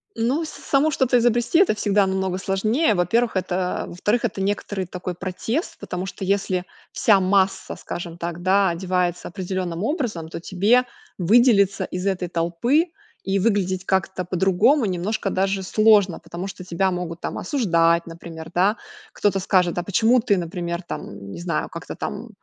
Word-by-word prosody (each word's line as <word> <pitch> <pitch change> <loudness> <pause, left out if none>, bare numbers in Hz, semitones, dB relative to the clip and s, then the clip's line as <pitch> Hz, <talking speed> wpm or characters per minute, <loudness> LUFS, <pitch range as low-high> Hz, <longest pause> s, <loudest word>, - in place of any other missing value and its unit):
Ну, 250 +8 0
с - - -7
самому 295 +2 +1
что-то 260 -3 +2
изобрести- 240 +6 +2
это 375 - +4
всегда 205 -1 +2
намного 190 -1 -1
сложнее. 215 +8 +1
Во-первых, 220 +7 +1
это, 185 -1 -1
э, - - -12
во-вторых 210 +7 0
некоторый 195 0 -2
такой 180 0 -5
протест, 195 - -3
потому 180 +1 -4
что 195 - -7
если 190 -2 0 0.3
вся 205 -3 +4
масса, 190 0 +1
скажем 170 -1 -7
так, 170 0 -5
да, 190 +1 +3
одевается 180 0 -1
определенным 185 -1 -4
образом, 220 - -2
то - - -6
тебе 205 +8 +3 0.3
выделиться 200 0 +4
из 180 +1 -5
этой 185 -2 -1
толпы, 175 - +1 0.4
и 195 0 0
выглядеть 190 -3 +1
как-то 190 -1 0
по-другому, 190 - +3
немножко 195 +3 -2
даже 195 +1 0
сложно, 205 -2 +4
потому 175 +3 -7
что 195 -1 -8
тебя 185 +2 0
могут 175 -2 -4
там - - -4
осуждать, 170 - +2
например, 165 -1 -9
да. 195 +5 +3 0.3
Кто-то 200 -1 +1
скажет: 180 -2 +2
"А 175 - 0
почему 225 +6 +3
ты, 210 -4 +2
например 170 0 -3
там, 100 - -8
не - - -7
знаю 170 -3 -1
как-то - - -8
там - - -5
190 Hz, 160 wpm, -22 LUFS, 175-215 Hz, 0.4 s, это